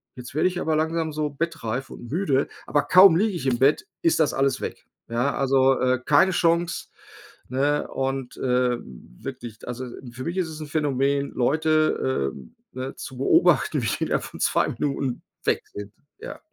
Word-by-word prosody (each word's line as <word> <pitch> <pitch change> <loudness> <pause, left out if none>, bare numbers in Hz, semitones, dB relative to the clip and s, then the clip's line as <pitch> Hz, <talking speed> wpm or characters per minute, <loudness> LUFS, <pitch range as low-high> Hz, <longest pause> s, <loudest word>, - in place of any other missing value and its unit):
jetzt 125 0 -9
werde 155 - +3
ich 180 0 -4
aber 160 - 0
langsam 160 0 0
so 150 0 -1
bettreif 135 -5 -3
und 120 - -10
müde.” 145 -5 +1 0.2
Aber 145 - +2
kaum 185 -2 +7
liege 210 +2 +1
ich 170 - -5
im 120 -2 +1
Bett, 140 +3 +3 0.2
ist 165 - +2
das 155 - +2
alles 135 -1 +1
weg. - - -6 0.2
Ja. 120 +4 0
Also, 135 -1 +3
äh, 130 0 +2
keine 170 +6 +5
Chance, 170 -1 +1 0.6
ne, 145 +3 +1
und, 135 -1 -3
äh, 125 -1 +1
wirklich. 115 - -10
Also, 125 +1 -5 0.3
für 130 +1 -7
mich 170 +3 -3
ist 185 -3 0
es 155 0 -8
'n 155 - -6
Phänomen, 140 -2 0
Leute, 155 - +1
ähm, 65 -3 -13 0.2
ne, 130 +1 -5
zu 130 - -8
beobachten, 135 - +3
wie - - 0
die - - -1
innerhalb - - -1
von - - -10
2 - - +2
Minuten 135 -3 -2 0.2
weg - - +1
sind, 105 0 -7 0.3
ja. - - -8
135 Hz, 180 wpm, -24 LUFS, 125-155 Hz, 0.6 s, kaum